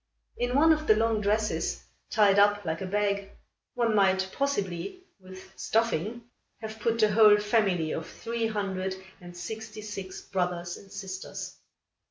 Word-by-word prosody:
In 245 Hz, +1 st, -1 dB
one 320 Hz, +3 st, +6 dB
of 310 Hz, 0 st, -3 dB
the 215 Hz, -, +6 dB
long 225 Hz, 0 st, +1 dB
dresses, 210 Hz, +1 st, 0 dB, 0.3 s
tied 205 Hz, -3 st, +4 dB
up 205 Hz, -1 st, +4 dB
like 160 Hz, +1 st, -2 dB
a 190 Hz, -, -3 dB
bag, 200 Hz, 0 st, 0 dB, 0.5 s
one 235 Hz, -2 st, +1 dB
might 190 Hz, -1 st, +3 dB
possibly, 280 Hz, -, -2 dB, 0.2 s
with 185 Hz, 0 st, -13 dB
stuffing, 225 Hz, 0 st, 0 dB, 0.4 s
have 220 Hz, 0 st, -7 dB
put 230 Hz, +1 st, +1 dB
the 215 Hz, -2 st, +4 dB
whole 210 Hz, 0 st, +7 dB
family 205 Hz, -7 st, +1 dB
of 160 Hz, -, -4 dB
three 230 Hz, 0 st, -3 dB
hundred 190 Hz, -3 st, -2 dB, 0.2 s
and 175 Hz, 0 st, -11 dB
sixty 220 Hz, +4 st, -7 dB
six 195 Hz, -3 st, -6 dB
brothers 180 Hz, -2 st, -2 dB
and 195 Hz, -, -14 dB
sisters. 190 Hz, -1 st, -7 dB
205 Hz, 150 wpm, -28 LUFS, 190-225 Hz, 0.5 s, whole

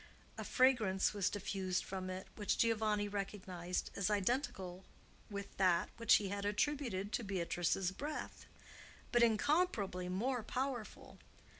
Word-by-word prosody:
A -, -, -5 dB
fragrance 225 Hz, -8 st, +3 dB
was 200 Hz, -3 st, +1 dB
diffused 190 Hz, -2 st, -2 dB
from 185 Hz, -1 st, -4 dB
it 185 Hz, +1 st, -5 dB
which 205 Hz, -2 st, 0 dB
Giovanni 215 Hz, -2 st, +2 dB
recognized 190 Hz, -3 st, -3 dB
as 200 Hz, +1 st, +1 dB
identical 195 Hz, -4 st, -1 dB, 0.5 s
with 200 Hz, -1 st, -6 dB
that 180 Hz, -3 st, +3 dB
which 230 Hz, -1 st, +6 dB
he 200 Hz, -2 st, +1 dB
had 200 Hz, 0 st, -3 dB
attributed 210 Hz, -2 st, 0 dB
to 240 Hz, -, -1 dB
Beatrice's 180 Hz, -1 st, 0 dB
breath, 295 Hz, +9 st, -5 dB, 0.6 s
but 240 Hz, -, +4 dB
incomparably 225 Hz, -, +2 dB
more 240 Hz, +7 st, 0 dB
powerful. 250 Hz, 0 st, -4 dB
205 Hz, 125 wpm, -37 LUFS, 190-235 Hz, 0.6 s, which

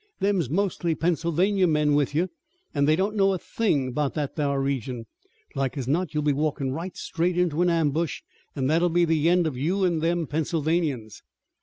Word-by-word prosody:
Them's 190 Hz, -, +1 dB
mostly 175 Hz, -1 st, 0 dB
Pennsylvania 175 Hz, +4 st, +1 dB
men 150 Hz, -2 st, +2 dB
with 145 Hz, 0 st, +1 dB
you, 175 Hz, +4 st, +1 dB, 0.4 s
an' 140 Hz, -1 st, +2 dB
they 155 Hz, +2 st, +4 dB
don't 195 Hz, +5 st, -1 dB
know 195 Hz, -1 st, +3 dB
a -, -, -1 dB
thing 150 Hz, -, -1 dB
'bout 145 Hz, +2 st, -1 dB
that 150 Hz, -3 st, -3 dB
thar 140 Hz, -3 st, 0 dB
region. 130 Hz, -3 st, -2 dB, 0.5 s
Like 135 Hz, 0 st, -2 dB
as 130 Hz, -3 st, -3 dB
not 160 Hz, +3 st, 0 dB
you'll 150 Hz, -, +1 dB
be 145 Hz, -1 st, +2 dB
walkin' 145 Hz, -2 st, -1 dB
right 170 Hz, +6 st, -5 dB
straight 175 Hz, +1 st, -1 dB
into 175 Hz, -2 st, +1 dB
an 180 Hz, -, +3 dB
ambush, 165 Hz, -1 st, 0 dB, 0.3 s
an' 135 Hz, -3 st, -1 dB
that'll 165 Hz, +5 st, +3 dB
be 175 Hz, +1 st, +3 dB
the 160 Hz, 0 st, +2 dB
end 175 Hz, 0 st, +3 dB
of 150 Hz, -5 st, -2 dB
you 185 Hz, +7 st, +1 dB
an' 170 Hz, -3 st, +1 dB
them 170 Hz, +1 st, 0 dB
Pennsylvanians." 155 Hz, -6 st, -1 dB
160 Hz, 190 wpm, -25 LUFS, 145-175 Hz, 0.5 s, they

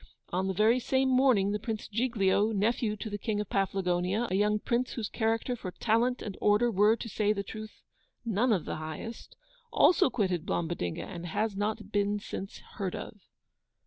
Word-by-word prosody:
On 185 Hz, +2 st, 0 dB
the 190 Hz, -, 0 dB
very 220 Hz, +5 st, +4 dB
same 265 Hz, +1 st, +1 dB
morning 255 Hz, -7 st, +4 dB
the 210 Hz, -, -1 dB
Prince 220 Hz, -1 st, -4 dB
Giglio, 215 Hz, -2 st, +1 dB
nephew 215 Hz, +1 st, +1 dB
to 220 Hz, -, -5 dB
the 205 Hz, -1 st, -4 dB
King 210 Hz, 0 st, -1 dB
of 210 Hz, -, -3 dB
Paflagonia, 195 Hz, +2 st, 0 dB
a -, -, +1 dB
young 210 Hz, +1 st, +3 dB
Prince 240 Hz, +4 st, -1 dB
whose 225 Hz, -3 st, -3 dB
character 225 Hz, +2 st, 0 dB
for 200 Hz, -6 st, -6 dB
TALENT 230 Hz, +6 st, +1 dB
and 200 Hz, -3 st, -5 dB
ORDER 210 Hz, +3 st, +4 dB
were, 210 Hz, +2 st, +4 dB
to 230 Hz, -, -7 dB
say 210 Hz, -1 st, +1 dB
truth, 215 Hz, +2 st, -9 dB, 0.4 s
none 230 Hz, +3 st, +2 dB
of 190 Hz, -7 st, +1 dB
the -, -, -4 dB
HIGHEST, 160 Hz, +9 st, -7 dB, 0.4 s
also 350 Hz, -, +5 dB
quitted 185 Hz, -9 st, 0 dB
Blombodinga, 165 Hz, -, -2 dB
and 175 Hz, -2 st, -7 dB
has 210 Hz, +5 st, -1 dB
not 210 Hz, +2 st, -2 dB
been 205 Hz, 0 st, +1 dB
since 195 Hz, -1 st, -6 dB, 0.2 s
heard 195 Hz, -4 st, -2 dB
of! -, -, -7 dB
210 Hz, 175 wpm, -30 LUFS, 195-230 Hz, 0.4 s, also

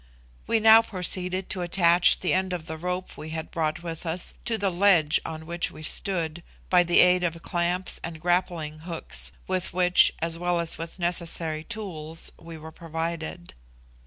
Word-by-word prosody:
We 225 Hz, -, +2 dB
now 220 Hz, +1 st, +8 dB
proceeded 185 Hz, -2 st, -2 dB
to 185 Hz, -, -2 dB
attach 175 Hz, 0 st, +4 dB
the 180 Hz, -, +1 dB
end 185 Hz, 0 st, 0 dB
of 170 Hz, -3 st, -5 dB
the 160 Hz, -, -6 dB
rope 180 Hz, +3 st, -4 dB
we 155 Hz, -, -7 dB
had 160 Hz, 0 st, -5 dB
brought 160 Hz, 0 st, -2 dB
with 165 Hz, -2 st, -6 dB
us 170 Hz, +1 st, -3 dB
to 230 Hz, -1 st, +1 dB
the 200 Hz, -2 st, 0 dB
ledge 175 Hz, -4 st, +3 dB
on 160 Hz, 0 st, -7 dB
which 170 Hz, +1 st, -2 dB
we 155 Hz, -, -12 dB
stood, 170 Hz, -2 st, -1 dB, 0.3 s
by 180 Hz, -1 st, +6 dB
the 175 Hz, 0 st, +5 dB
aid 180 Hz, 0 st, +4 dB
of 165 Hz, -1 st, -1 dB
clamps 175 Hz, +2 st, -1 dB
and 165 Hz, -1 st, -6 dB
grappling 170 Hz, -3 st, -1 dB
hooks, 165 Hz, 0 st, -3 dB, 0.2 s
with 185 Hz, -1 st, -1 dB
which, 180 Hz, 0 st, +5 dB
as 165 Hz, 0 st, -3 dB
well 175 Hz, 0 st, 0 dB
as 165 Hz, -1 st, -2 dB
with 165 Hz, +2 st, -7 dB
necessary 170 Hz, -3 st, -1 dB
tools, 165 Hz, -7 st, -3 dB
we 165 Hz, 0 st, -10 dB
were 160 Hz, +1 st, -10 dB
provided. 165 Hz, +1 st, -5 dB
175 Hz, 175 wpm, -26 LUFS, 160-180 Hz, 0.3 s, now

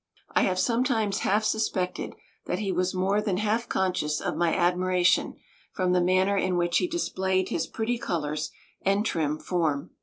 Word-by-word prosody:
I -, -, +3 dB
have 185 Hz, -1 st, +1 dB
sometimes 230 Hz, -2 st, +1 dB
half 210 Hz, +3 st, +1 dB
suspected 210 Hz, -4 st, -1 dB, 0.3 s
that -, -, -1 dB
he 195 Hz, -1 st, -2 dB
was 185 Hz, +1 st, 0 dB
more 195 Hz, +3 st, +1 dB
than 200 Hz, -4 st, -1 dB
half 215 Hz, +3 st, 0 dB
conscious 155 Hz, -5 st, 0 dB
of -, -, -2 dB
my 170 Hz, -1 st, +2 dB
admiration 180 Hz, 0 st, +2 dB, 0.4 s
from 185 Hz, -2 st, 0 dB
the 180 Hz, 0 st, +3 dB
manner 185 Hz, +3 st, +3 dB
in 185 Hz, -2 st, +1 dB
which 175 Hz, 0 st, +2 dB
he 360 Hz, -, 0 dB
displayed 190 Hz, -, -1 dB
his 165 Hz, -, -1 dB
pretty 230 Hz, +2 st, -2 dB
colors 150 Hz, -6 st, -2 dB, 0.3 s
and 200 Hz, +2 st, +1 dB
trim 155 Hz, -7 st, 0 dB
form. 155 Hz, -3 st, -1 dB
185 Hz, 170 wpm, -27 LUFS, 175-210 Hz, 0.4 s, I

